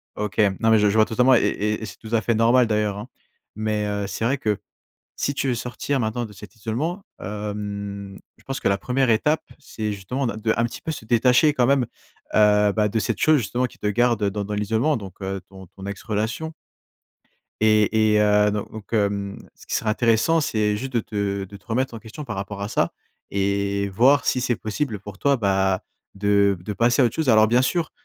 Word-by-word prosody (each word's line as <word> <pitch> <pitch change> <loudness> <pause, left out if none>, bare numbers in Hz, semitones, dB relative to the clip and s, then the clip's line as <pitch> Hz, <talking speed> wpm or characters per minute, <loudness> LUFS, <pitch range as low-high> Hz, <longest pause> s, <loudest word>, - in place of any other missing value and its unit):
OK. 105 0 -4 0.2
Non, 115 - +3
mais 110 - +6
je 105 0 +4
je 100 - -1
vois 110 - +6
totalement 125 +3 +4
et - - +5
et 105 +1 0
et - - -4
c'est 90 -3 -10
tout 110 +1 -10
à 110 - +2
fait 115 +2 0
normal, 115 +2 +4
d'ailleurs, 105 -2 0
hein. 105 +4 -7 0.5
Mais 105 -1 -1
heu, 100 -1 -2
c'est 110 - -4
vrai 135 +4 +1
que 105 -5 -1 0.6
si 140 - -1
tu 135 - -1
veux 125 - +2
sortir 125 +3 -2
maintenant 115 +1 -1
de 105 - -9
cet 105 +3 -12
isolement, 135 - -3 0.2
hem, 100 -1 -5 0.2
je - - -24
pense 135 0 -4
que - - +1
la 100 - +1
première 130 +1 +1
étape, 150 +8 +2 0.2
c'est 110 -7 -4
justement 115 +8 -3
de 110 -3 -3
de, 110 +1 0
un 115 - +2
petit 120 - -4
peu, 160 - -3
se 145 - -8
détacher 125 +6 +4
quand 125 -4 +2
même, 135 -2 +3 0.5
heu 105 -1 +5
bah, 105 0 +1
de 110 +2 -1
cette 110 -2 -1
chose, 155 +5 +4
justement, 125 +2 -1
qui - - -16
te - - -4
garde 115 0 +2
dans 105 0 -3
dans 105 - -4
l'isolement, 110 +8 +1
donc 100 -4 -8 0.3
ton 95 -1 -12
ton 95 +3 -11
ex-relation. 110 +9 -3 1.1
Et 110 0 +4
et 105 - +4
heu, 105 0 +4
do 105 0 -2
donc, 110 -2 -11
mmh, 100 -2 0 0.2
ce - - -17
qui - - -2
serait 110 - 0
intéressant, 115 +8 +3
c'est 105 -6 0
juste 130 +5 -5
de 120 - +2
te 100 -2 -2
de 100 +1 -11
te - - -28
remettre 125 +2 -1
en 115 - -6
question 120 +7 -9
par 110 -5 -5
rapport 100 +1 -5
à 100 - -2
ça - - 0 0.4
et 100 0 0
voir 130 +9 +4
si 125 - +1
c'est 125 -1 +1
possible 110 -1 -3
pour 100 0 -10
toi, 140 +4 +2
bah, 95 -2 +1 0.3
de 100 -1 +3
de 105 +4 -5
passer 120 +5 +3
à - - +6
autre 115 - -1
chose. 160 -4 0
Alors, 110 -1 +6
bien 120 +3 +4
sûr, 165 +5 0
110 Hz, 225 wpm, -23 LUFS, 100-120 Hz, 1.1 s, mais